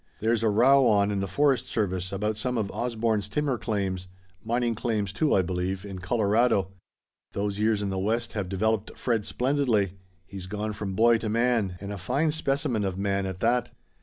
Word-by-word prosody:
There's 115 +1 +1
a 115 - +3
row 130 +5 +5
on 100 -2 +3
in 100 - -1
the 95 - -2
forest 135 +1 +2
service 95 -4 -2
about 105 +2 -1
some 125 +3 -2
of 105 -3 -1
Osborne's 115 -4 -1
timber 140 +1 -1
claims 95 -4 -2 0.4
mining 120 +1 0
claims, 105 -3 -2
too, 145 +9 +2
I 95 - +3
believe 90 +2 -3
in 95 -2 -7
Colorado. 105 0 +2 0.6
Those 100 0 -2
years 105 -1 +2
in 100 - -2
the 95 - -2
West 115 +4 -1
have 100 -4 -3
developed 110 +2 -1
Fred 115 -4 0
splendidly. 125 -8 +1 0.3
He's 95 0 -8
gone 105 +2 -3
from 100 -2 -4
boy 115 +2 +5
to 110 - -3
man, 115 -5 +1
and 100 +1 -6
a 100 - -6
fine 140 - 0
specimen 135 -7 -1
of 95 -2 -2
man, 100 -1 0
at 95 -1 -6
that." 120 +1 +2
105 Hz, 190 wpm, -27 LUFS, 100-120 Hz, 0.6 s, row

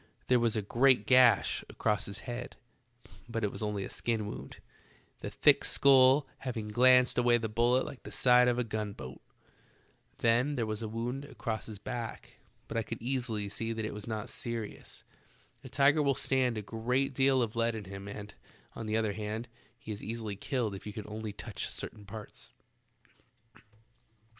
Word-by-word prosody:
There 125 -1 +5
was 115 -1 +1
a 110 - 0
great 120 +1 +4
gash 125 -1 +5
across 105 -1 0
his 100 +1 -6
head, 120 0 -6 0.7
but 115 -1 -3
it 105 - +1
was - - -8
only 105 -2 -2
a - - -6
skin 115 -3 -1
wound, 105 - -8 0.6
the - - -5
thick - - +4
skull 135 +1 +6
hav 125 -3 -4
ing 105 -1 -4
glanced 125 +3 +5
away 120 -1 +4
the 115 -1 -2
bullet 120 +4 +2
like 130 - -8
the - - -10
side 125 -1 +5
of 120 -1 +2
a 125 - +1
gun 110 -2 -3
boat. 65 -7 -9 1.0
Then 120 +5 +2
there 120 -4 0
was 110 0 -4
a 110 - -3
wound 120 +5 -4
across 115 -6 -4
his 110 -2 -7
back, 115 +3 -6 0.3
but 115 - -4
I - - +2
could 115 +1 -6
easily 120 -4 -2
see 115 +3 -4
that 110 -1 -3
it - - -4
was 105 +1 -8
not 110 0 -3
serious. 115 -4 -6 0.6
A - - -9
tiger 145 +2 +4
will 140 -2 +2
stand 130 -3 +1
a 105 - -4
great 125 +6 -1
deal 135 -1 +3
of 115 0 -4
lead 115 0 +1
in 110 - -5
him, 95 +1 -8
and, 105 0 -7 0.4
on 115 - -6
the 110 +1 +1
other 110 -2 0
hand, 110 +3 -4 0.3
he 110 - -8
is 105 - -6
easily 110 -1 -4
killed 115 0 -2
if 95 - -8
you 105 - -6
can 105 -1 -6
only 110 0 -5
touch 100 -3 -5
certain 105 - -8
parts. 105 +1 -10
115 Hz, 185 wpm, -31 LUFS, 105-125 Hz, 1.0 s, skull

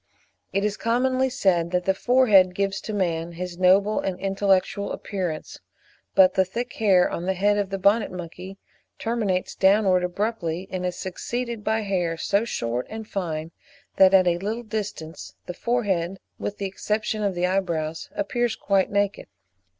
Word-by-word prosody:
It 200 +2 0
is 210 0 -1
commonly 255 +3 +1
said 175 -8 +1
that 180 0 -1
the 190 - +3
forehead 205 -6 +4
gives 195 0 -1
to - - -6
man 170 -4 -1
his 175 +1 -6
noble 195 +3 +4
and 185 -1 -3
intellectual 195 +1 +1
appearance; 180 -6 -4 0.6
but 185 -1 +6
the 190 - +4
thick 235 +6 -5
hair 190 -5 +4
on 175 - -4
the 190 - +1
head 205 +2 +2
of 200 -2 -1
the 195 - -2
Bonnet 200 +3 +2
monkey 180 +2 -8 0.4
terminates 215 -6 -1
downwards 190 -2 +3
abruptly, 180 -2 -2
and 185 -1 -2
is 180 - -3
succeeded 235 +5 -4
by 220 +1 +1
hair 180 -5 -1
so 200 +6 +1
short 120 - -2
and 220 0 -7
fine 165 -5 -4 0.5
that 190 -1 +7
at 185 -1 +6
a 175 -1 +2
little 220 +5 -3
distance 205 -7 -6
the 180 - -5
forehead, 195 -5 -1 0.2
with 205 - -4
the 200 - -3
exception 210 +2 -2
of 200 -3 0
the 175 +1 +1
eyebrows, 170 -4 -1
appears 240 -6 -1
quite 195 -1 +1
naked. 200 0 -1
195 Hz, 165 wpm, -24 LUFS, 180-215 Hz, 0.6 s, that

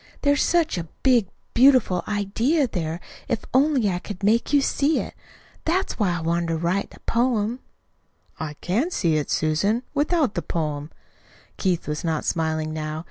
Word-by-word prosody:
There's 285 0 +3
such 335 - +2
a 165 - -4 0.2
big, 245 -7 +4 0.3
beautiful 250 -8 +5
idea 225 +9 +1
there, 170 -6 -3 0.3
if 235 -3 -2
only 270 -3 +3
I 180 -2 0
could 200 0 -8
make 225 +5 +2
you 290 - +5
see 280 +2 +1
it. - - -5 0.5
That's 365 0 -1
why 180 -5 +1
I - - -5
wanted 170 +1 0
to 165 -1 0
write 175 +4 -1
the - - -17
poem." 235 -1 0 0.8
"I 150 -1 -4
can 225 - 0
see 170 - +1
it, 150 - -2
Susan 200 +10 +1
without 295 - +1
the 175 - -2
poem." 150 -3 -3 0.7
Keith 180 -4 0
was 150 0 -3
not 160 -2 -1
smiling 160 -1 -1
now. 155 0 -4
200 Hz, 165 wpm, -24 LUFS, 165-260 Hz, 0.8 s, beautiful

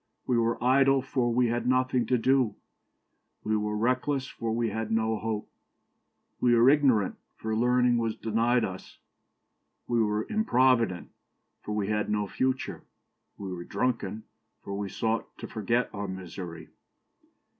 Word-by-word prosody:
We 125 - +1
were 115 0 +1
idle, 135 +1 +4
for 125 -2 0
we 120 0 +2
had 120 +1 -1
nothing 130 -2 +2
to 125 - +3
do; 130 -1 +2 0.9
we 110 - 0
were 105 0 -1
reckless, 130 +4 0
for 115 -4 -4
we 115 0 0
had 110 0 -3
no 110 -1 +1
hope; 110 -2 -3 0.9
we 120 -1 +4
were 120 +3 +6
ignorant, 130 -9 +3 0.2
for 110 0 -3
learning 125 +1 +3
was 115 -1 -1
denied 115 +2 +1
us; 95 -1 -8 0.9
we 120 -1 +2
were 105 0 0
improvident, 130 - +2 0.5
for 105 - -5
we 105 -1 -1
had 105 -1 0
no 105 -1 0
future; 130 +6 -2 0.6
we 95 -2 -5
were 85 -1 -6
drunken, 110 0 -2 0.4
for 100 - -6
we 100 0 -3
sought 115 +3 -2
to - - -7
forget 115 +3 0
our 100 -1 -4
misery. 90 -3 -7
115 Hz, 145 wpm, -28 LUFS, 105-125 Hz, 0.9 s, were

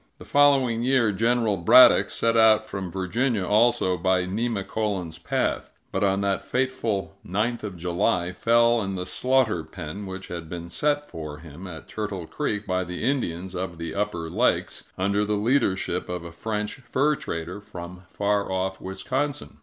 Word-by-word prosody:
The - - -12
following 135 -5 +4
year, 125 -3 +3
General 115 0 +1
Braddock 85 - +7
set 115 0 +1
out 110 -1 +5
from 95 -3 -5
Virginia, 100 +3 0
also 105 -3 +3
by 95 -1 +2
Nemacolin's 100 -4 -2
Path; - - -2
but, - - -1
on 100 0 +2
that 100 -1 0
fateful 120 -7 -2
ninth 110 +6 -1
of 100 -4 -5
July, 85 +1 0
fell 115 +4 +3
in 95 -1 -3
the 90 -1 -3
slaughter 125 -7 +1
pen 90 +5 -7
which 95 0 -7
had 85 -2 -6
been 85 0 -6
set 145 +9 0
for 75 -2 -7
him 80 +3 -10
at 80 -3 -9
Turtle 100 -5 -4
Creek 105 +5 -3
by 95 -1 0
the 90 +2 -6
Indians 95 -9 -1
of 90 -2 -4
the 85 -1 -5
Upper 100 -5 -2
Lakes, - - 0
under 100 +2 +1
the 105 0 0
leadership 100 -7 0
of 90 -1 -4
a 85 - -8
French 105 +4 -3
fur 135 +3 +1
trader 85 - -5
from 90 -2 -9
far 100 -1 0
off 95 0 -2
Wisconsin. 135 +9 -3
100 Hz, 160 wpm, -25 LUFS, 90-115 Hz, -, Braddock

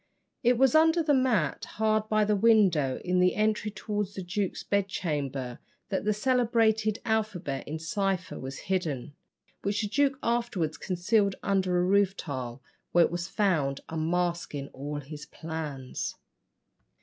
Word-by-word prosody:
It 245 -1 +3
was 265 0 +4
under 320 +1 +5
the 300 -2 +3
mat, 245 - +1
hard 215 0 +1
by 215 0 +3
a 210 0 +2
window 195 - +4
in 180 0 +2
the 180 0 +3
entry 215 0 +1
towards 205 0 -3
the 190 - -4
duke's 190 +2 -2
bedchamber, 145 -10 -2 0.3
that 195 - -1
the 210 - +3
celebrated 225 -2 +2
alphabet 205 -11 -1
in 155 - -3
cipher 185 +2 -2
was 135 +1 -6
hidden, 160 -7 -2 0.5
which 205 +2 -1
the - - 0
duke 275 +4 +2
afterwards 230 -10 0
concealed 200 +2 +1
under 190 -3 +1
a 175 - +3
roof 200 0 +3
tile, 130 -4 -5 0.3
where 175 -1 +6
it - - -3
was 175 0 -3
found, 155 -10 +1
unmasking 165 -3 -1
all 145 +2 -5
his 145 +1 -9
plans. 150 -5 -5
190 Hz, 145 wpm, -28 LUFS, 155-215 Hz, 0.5 s, where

